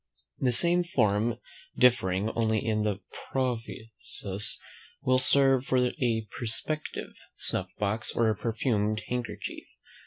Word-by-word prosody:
The 125 - +2
same 175 +7 +4
form, 115 -7 +1 0.4
differing 105 -5 +3
only 110 -1 +1
in 110 -1 +1
the 105 -2 -1 0.3
provisos, 115 -5 -2 0.4
will 130 0 +3
serve 135 0 +4
for 130 - +2 0.2
a 110 -3 +1
perspective, 150 +6 -1 0.2
snuff 95 0 -1
box, 105 +2 -1
or 110 -2 +3
perfumed 110 -1 -1
handkerchief. 125 -1 -4
115 Hz, 105 wpm, -28 LUFS, 105-130 Hz, 0.4 s, same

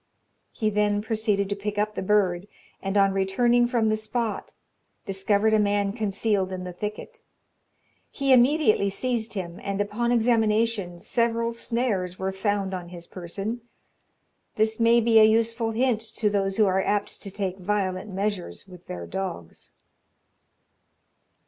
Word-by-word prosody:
He 215 -2 -1
then 205 0 +1
proceeded 215 -3 0
to 200 - -1
pick 205 +1 -4
up 210 +1 0
the - - -4
bird, 190 -2 +1 0.3
and 195 +1 -1
on 195 -1 +4
returning 240 +6 +2
from 235 -2 +1
the 215 - +2
spot, 220 +1 -3 0.5
discovered 200 +2 +1
a 215 - +4
man 205 -1 +1
concealed 205 -3 -1
in 185 -1 -5
the 180 -1 -6
thicket. 210 - -6 0.9
He 275 -1 +2
immediately 250 -5 +4
seized 230 +1 -2
him, 175 -4 -5
and 200 0 -3
upon 215 +4 -1
examination, 225 -5 +1
several 230 +4 0
snares 230 -6 -2
were 190 0 -2
found 195 0 -1
on 180 -2 -5
his 175 -1 -10
person. 195 +7 -5 0.9
This 220 +1 +1
may 230 +1 +5
be 225 -1 +5
a - - +8
useful 225 +1 +2
hint 230 0 +1
to 210 -2 +1
those 195 -1 0
who 215 - +5
are 190 0 +2
apt 205 +1 -2
to 200 - -6
take 190 -1 -4
violent 190 0 -2
measures 195 0 -3
with 180 -2 -14
their 85 -1 -6
dogs. 85 - -6
210 Hz, 150 wpm, -25 LUFS, 195-225 Hz, 0.9 s, a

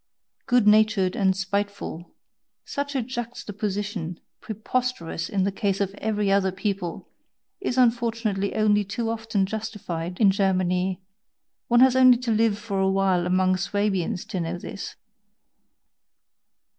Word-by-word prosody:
"Good 245 -3 +3
natured 210 -3 +4
and 190 -1 +2
spiteful" 200 -3 -4 0.5
such 285 0 -4
a 260 - +1
juxtaposition, 210 -7 -4 0.2
preposterous 220 -6 -3
in 195 -2 0
the 200 - +1
case 195 0 -1
of 195 -1 -1
every 210 -2 0
other 195 -1 +3
people, 190 -2 -4 0.5
is 260 -9 -2
unfortunately 230 -5 +1
only 210 -1 +3
too 225 +3 -3
often 225 -3 -1
justified 190 -5 -5
in 205 -4 +6
Germany 185 -1 0 0.6
one 240 +1 +4
has 260 -1 +6
only 255 -1 +7
to 245 -1 -2
live 220 -1 +2
for 205 -2 -3
a 190 0 +2
while 190 -2 +2
among 185 0 +2
Swabians 195 0 -1
to 195 -5 -4
know 170 +1 -3
this! 195 - -7
200 Hz, 130 wpm, -25 LUFS, 190-225 Hz, 0.6 s, only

